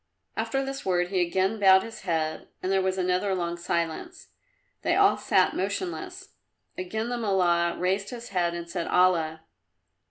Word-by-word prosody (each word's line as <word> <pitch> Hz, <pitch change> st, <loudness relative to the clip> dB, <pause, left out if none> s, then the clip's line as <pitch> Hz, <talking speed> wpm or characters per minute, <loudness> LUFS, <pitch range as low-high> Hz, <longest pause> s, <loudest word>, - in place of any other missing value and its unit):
After 270 Hz, -1 st, -1 dB
this 270 Hz, 0 st, -5 dB
word 180 Hz, -1 st, +1 dB
he 185 Hz, -1 st, +1 dB
again 190 Hz, +5 st, 0 dB
bowed 190 Hz, -1 st, +6 dB
his 230 Hz, -, -8 dB
head, 160 Hz, -3 st, -2 dB, 0.2 s
and 185 Hz, -, 0 dB
there 195 Hz, 0 st, +3 dB
was 190 Hz, 0 st, 0 dB
another 185 Hz, +1 st, +1 dB
long 170 Hz, -1 st, -2 dB
silence. 170 Hz, -, -3 dB, 0.5 s
They -, -, +1 dB
all -, -, +5 dB
sat -, -, +2 dB
motionless. 370 Hz, -2 st, -4 dB, 0.5 s
Again 220 Hz, +5 st, -3 dB
the 245 Hz, -1 st, -2 dB
Mullah 175 Hz, -5 st, +2 dB
raised 190 Hz, +3 st, 0 dB
his 240 Hz, -1 st, -8 dB
head 175 Hz, -3 st, 0 dB
and 170 Hz, 0 st, -6 dB
said 170 Hz, 0 st, -3 dB
"Allah!" 165 Hz, -3 st, +2 dB
185 Hz, 160 wpm, -27 LUFS, 170-200 Hz, 0.5 s, bowed